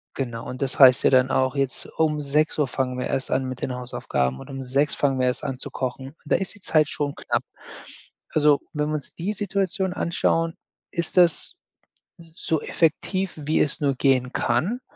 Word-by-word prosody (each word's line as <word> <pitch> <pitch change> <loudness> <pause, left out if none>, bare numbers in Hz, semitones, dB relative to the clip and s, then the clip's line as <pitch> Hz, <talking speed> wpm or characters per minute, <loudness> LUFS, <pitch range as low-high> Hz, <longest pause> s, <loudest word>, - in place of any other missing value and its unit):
genau 120 -4 -4
und 130 +2 -7
das 135 -1 0
heißt 130 -1 +8
ja - - +5
dann 130 0 +4
auch, 130 +1 +1
jetzt 135 -1 -1
um 150 -2 +1
18:00 150 0 +1
fangen 125 -1 -2
wir 125 - -2
erst 135 - -2
an 130 0 +1
mit 130 -1 -6
den 130 - -2
Hausaufgaben 65 - -2
und - - -11
um 135 -1 -6
18:00 140 +4 +1
fangen 135 -2 +1
wir 125 - +2
erst 125 - -1
an 135 -3 -3
zu - - -6
kochen. 130 +2 -5
Da - - +2
ist 195 - -4
die 205 - -18
Zeit 155 -4 +3
schon 145 -1 -2
knapp. - - -2 0.9
Also, 150 -2 +3
wenn 150 0 -1
wir 155 - -1
uns 145 - -6
die 185 +5 -3
Situation 195 -2 -1
anschauen, 165 0 0 0.4
ist 170 0 -3
das 175 - +4 0.8
so 160 -2 -1
effektiv, 185 +3 0
wie 155 +1 0
es 140 - +3
nur 140 -2 +1
gehen 130 -2 +2
kann. 170 - 0
140 Hz, 195 wpm, -24 LUFS, 130-160 Hz, 0.9 s, heißt